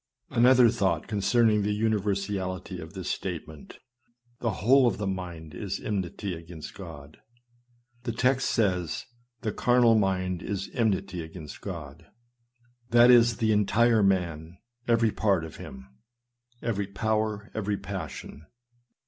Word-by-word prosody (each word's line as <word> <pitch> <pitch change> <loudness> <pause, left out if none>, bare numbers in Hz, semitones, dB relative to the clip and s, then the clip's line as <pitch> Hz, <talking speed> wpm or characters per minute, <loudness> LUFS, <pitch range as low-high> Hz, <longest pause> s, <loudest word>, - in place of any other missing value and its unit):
Another 125 0 +6
thought 95 -8 0
concerning 105 +1 +3
the 105 +1 0
universality 100 -3 -1
of 80 -1 -9
this 95 -2 -6
statement. 80 -5 -6 0.6
The 115 -3 -1
whole 130 +1 +6
of 115 - 0
the 105 - -3
mind 90 -5 -5
is 100 -2 -4
enmity 100 -1 -3
against 80 -2 -9
God. 80 -5 -11 0.8
The 120 -1 -3
text 130 +3 +1
says, 90 - 0 0.2
" 120 -1 -47
The 110 - 0
carnal 120 0 +4
mind 95 -4 0
is 100 -2 -4
enmity 100 -6 0
against 80 -2 -9
God." 85 -4 -8 0.8
That 120 +1 +7
is, 120 -2 +5
the 110 -1 +1
entire 110 +2 +3
man, 85 -4 0 0.3
every 115 -2 +3
part 100 -7 +1
of 80 - -10
him 65 0 -10 0.4
— - - -56 0.3
every 100 -4 -1
power, 105 +1 -2
every 105 -2 -1
passion. 80 -6 -7
100 Hz, 130 wpm, -27 LUFS, 90-115 Hz, 0.8 s, That